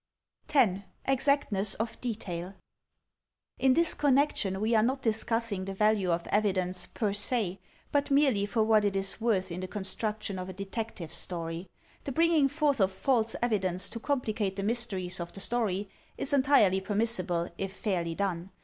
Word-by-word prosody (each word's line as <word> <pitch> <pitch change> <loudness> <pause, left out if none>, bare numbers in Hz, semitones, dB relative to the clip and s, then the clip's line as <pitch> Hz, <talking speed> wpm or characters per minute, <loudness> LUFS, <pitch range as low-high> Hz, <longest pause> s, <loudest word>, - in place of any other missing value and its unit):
10. 205 -9 +3 0.2
Exactness 270 -7 +2
of 225 +1 -4
Detail 195 -6 -4 1.0
In 265 -1 +4
this 335 -1 +6
connection 270 -9 +1
we 220 +3 +1
are 220 - +5
not 260 +4 0
discussing 225 -2 0
the 195 +1 -5
value 210 -2 +2
of 170 0 +1
evi 205 0 +1
dence, 180 -1 -1
per 210 -3 -2
se, 205 -3 -1 0.3
but 285 0 +1
merely 275 -8 +3
for 220 +1 +1
what 215 -1 +4
it 200 -1 0
is 195 +2 -1
worth 195 -6 +1
in 170 - -4
the 185 - -4
con 205 +1 -5
struction 210 0 -2
of 185 +1 -5
a - - -6
Detective 195 -3 -5
Story. 170 0 -3 0.4
The 275 - -3
bringing 325 0 +4
forth 290 -2 +1
of 190 0 +3
false 230 +3 0
evidence 190 -5 0
to 230 - -6
complicate 220 -7 -1
the 195 - -3
mysteries 200 -5 0
of 170 0 -6
the - - -8
story, 205 -3 -1 0.3
is 275 - -1
entirely 260 -9 +4
permissible, 190 -5 -1
if 195 -1 -2
fairly 175 -5 -2
done. 185 -2 -2
205 Hz, 165 wpm, -29 LUFS, 190-240 Hz, 1.0 s, this